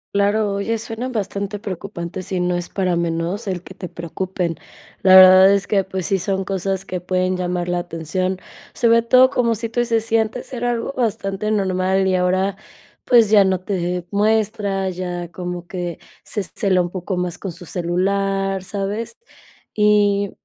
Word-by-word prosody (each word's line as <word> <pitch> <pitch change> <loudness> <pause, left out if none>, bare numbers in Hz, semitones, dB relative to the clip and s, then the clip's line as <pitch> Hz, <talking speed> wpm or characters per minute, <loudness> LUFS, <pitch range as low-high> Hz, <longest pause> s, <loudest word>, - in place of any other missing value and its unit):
Claro, 205 +1 +2
oye, 210 +3 -1
suena 225 +3 -5
bastante 200 -2 -3
preocupante. 185 -3 -6
Sí, 185 -1 -3
no 180 0 0
es 175 -1 -4
para 185 -3 0
menos 170 +5 -2
el 180 -2 -3
que 190 - -11
te 185 -2 -8
preocupen. 170 0 -4 0.4
La 190 0 +7
verdad 185 +1 +9
es 200 0 +2
que, 195 -2 +1
pues, 190 -2 -4
sí 195 -2 +1
son 190 +1 -1
cosas 195 0 -2
que 180 -2 -4
pueden 185 +1 0
llamar 180 -1 -2
la 175 0 0
atención. 175 +3 -3 0.4
Sobre 230 -1 +4
todo 255 +3 +5
como, 235 -4 +1
si 230 +2 -4
tú 230 - -2
dices, 230 -2 +1
si 225 0 +2
antes 225 +4 -3
era 245 0 -1
algo 240 +3 -2
bastante 215 -3 -1
normal 190 -2 +1
y 190 - +1
ahora, 185 +2 +1 0.5
pues, 230 -4 +5
ya 205 -2 +7
no 190 -1 0
te 180 -2 -2
muestra, 205 -2 +1
ya 175 -1 -5
como 180 -1 -5
que 175 -2 -4 0.3
se 205 -3 -3
cela 185 -1 +1
un 175 - -5
poco 185 0 -4
más 180 -1 -3
con 195 - -5
su 175 +2 -12
celular, 195 +3 -1
¿sabes? 205 +3 -4 0.6
Y, 205 -1 +3
195 Hz, 175 wpm, -20 LUFS, 180-210 Hz, 0.6 s, verdad